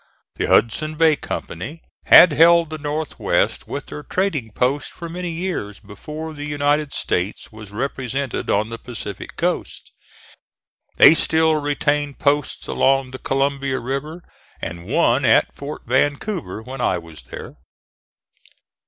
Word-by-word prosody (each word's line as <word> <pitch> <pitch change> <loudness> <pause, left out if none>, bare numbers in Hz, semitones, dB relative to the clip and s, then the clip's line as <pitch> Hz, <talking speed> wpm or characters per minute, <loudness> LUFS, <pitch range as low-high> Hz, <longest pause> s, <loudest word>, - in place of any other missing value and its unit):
The - - -1
Hudson's 155 +8 +2
Bay 160 -1 +5
Company 140 - -6 0.2
had 175 - +9
held 165 +1 +5
the 155 - -5
North 150 +1 -4
west - - 0
with - - -5
their 75 0 -8
trading 155 - -2
posts 130 +6 0
for 170 -1 -9
many 175 +1 -4
years 165 - -4
before 150 +10 -8
the 145 -1 -7
United 145 0 0
States 90 -4 -2
was 110 -2 -11
represented 130 +3 -3
on 105 +2 +1
the 115 0 -6
Pacific 110 -5 -7
coast. - - -3 1.1
They - - +9
still 160 -1 +2
retained 145 0 -1
posts 145 -1 0
along 135 -1 +1
the 130 - -8
Columbia 135 -1 0
River 150 +7 -4 0.4
and 85 +1 -6
one 135 -1 +2
at 115 -3 +3
Fort 145 +2 -7
Vancouver, 140 - -1
when 130 +2 -7
I 90 - +1
was 80 -2 -11
there. 75 - -9
140 Hz, 135 wpm, -21 LUFS, 115-155 Hz, 1.1 s, had